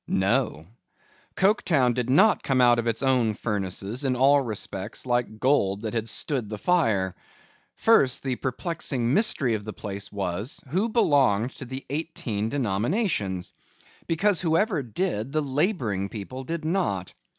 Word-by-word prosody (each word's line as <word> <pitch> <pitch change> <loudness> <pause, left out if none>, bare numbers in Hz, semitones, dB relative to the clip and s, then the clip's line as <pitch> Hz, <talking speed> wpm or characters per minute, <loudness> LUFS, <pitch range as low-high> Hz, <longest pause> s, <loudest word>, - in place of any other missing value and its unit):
No. 95 - 0 0.7
Coketown 175 - +3
did 125 0 -2
not 195 +11 +5
come 135 -2 0
out 120 -1 +5
of 120 - -2
its 115 +2 -1
own 125 -5 +2
furnaces, 100 +3 -3
in 130 -2 +1
all 140 +3 +5
respects 105 -3 -4
like 120 -3 -1
gold 105 -7 +2
that 110 - -3
had 115 -1 -1
stood 125 -3 -2
the 105 - -5
fire. 105 - +1 0.6
First, 140 - +3
the 130 -2 -1
perplexing 130 -2 -2
mystery 155 - +3
of 105 -2 -2
the 110 0 -6
place 100 -1 -6
was, 100 - -3
Who 190 - 0
belonged 135 - +3
to 135 - -7
the 130 +2 -7
eighteen 120 -9 -3
denominations? 110 - -1 0.5
Because, 180 +2 +2
whoever 180 +1 +1
did, 125 - -3
the 155 - +2
labouring 135 - -1
people 130 +6 -7
did 165 +1 -4
not. 155 - -1
125 Hz, 145 wpm, -25 LUFS, 105-155 Hz, 0.7 s, not